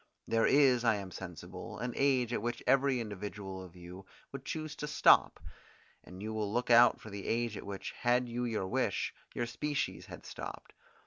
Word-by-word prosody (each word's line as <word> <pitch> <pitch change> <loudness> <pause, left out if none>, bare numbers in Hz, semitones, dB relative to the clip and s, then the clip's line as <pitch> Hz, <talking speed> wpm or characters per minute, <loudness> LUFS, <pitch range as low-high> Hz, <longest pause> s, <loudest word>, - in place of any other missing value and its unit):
There 115 0 +3
is, 135 -4 +5
I 115 -2 +4
am 100 -2 -6
sensible, 90 +4 -8
an 125 0 -3
age 130 -4 +2
at - - -1
which 120 +1 -3
every 135 0 +3
individual 100 -3 -6
of 90 -1 -13
you 90 +2 -11 0.2
would 135 -1 -8
choose 155 -1 -4
to 150 - -4
stop; 145 - +5 0.6
and 90 +2 -10
you 110 +1 -4
will 105 -2 -2
look 120 +2 0
out 120 +1 +7
for 110 - -11
the 100 -1 -6
age 115 -1 0
at - - -8
which, 100 -1 -5
had 125 +1 +1
you 120 +1 -3
your 110 -5 -1
wish, - - 0 0.2
your 120 - 0
species 140 +5 -3
had - - -10
stopped. - - -8
115 Hz, 190 wpm, -32 LUFS, 100-125 Hz, 0.6 s, out